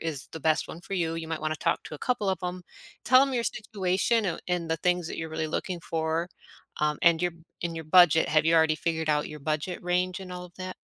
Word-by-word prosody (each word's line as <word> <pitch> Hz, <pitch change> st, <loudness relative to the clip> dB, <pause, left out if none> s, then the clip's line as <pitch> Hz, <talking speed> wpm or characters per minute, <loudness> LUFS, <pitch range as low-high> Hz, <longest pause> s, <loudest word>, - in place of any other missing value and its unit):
is 155 Hz, -5 st, -5 dB
the -, -, -7 dB
best 155 Hz, +1 st, +1 dB
one 165 Hz, -, -8 dB
for 195 Hz, -, -6 dB
you, 165 Hz, -3 st, 0 dB
you 165 Hz, -1 st, -5 dB
might 160 Hz, -1 st, -4 dB
wanna 155 Hz, 0 st, -1 dB
talk -, -, 0 dB
to -, -, -8 dB
a -, -, -19 dB
couple 235 Hz, -, -1 dB
of 190 Hz, -, +1 dB
'em. 180 Hz, 0 st, -4 dB, 0.4 s
Tell 255 Hz, +1 st, +7 dB
'em 275 Hz, -1 st, 0 dB
your 235 Hz, -, +1 dB
situation 210 Hz, +1 st, 0 dB
oh 170 Hz, -4 st, -1 dB
and 175 Hz, -2 st, -1 dB
the 160 Hz, -, +2 dB
things 180 Hz, 0 st, 0 dB
that -, -, -5 dB
you're 160 Hz, 0 st, -4 dB
really 160 Hz, 0 st, -2 dB
looking 175 Hz, +2 st, -3 dB
for, 165 Hz, +1 st, -1 dB, 0.5 s
um, 150 Hz, 0 st, +1 dB
and 170 Hz, -1 st, +5 dB
your 175 Hz, -1 st, 0 dB, 0.3 s
and 170 Hz, -1 st, -2 dB
your 160 Hz, -, -6 dB
budget. 165 Hz, 0 st, +6 dB
Have 155 Hz, 0 st, +3 dB
you 165 Hz, +1 st, +4 dB
already 160 Hz, -1 st, +5 dB
figured 160 Hz, -1 st, -2 dB
out 150 Hz, -1 st, +2 dB
your 150 Hz, 0 st, -9 dB
budget 155 Hz, +5 st, -2 dB
range 180 Hz, +1 st, 0 dB
and 185 Hz, -1 st, -9 dB
all 180 Hz, 0 st, -6 dB
of 175 Hz, -, -13 dB
that? 185 Hz, 0 st, -6 dB
170 Hz, 255 wpm, -27 LUFS, 160-180 Hz, 0.5 s, Tell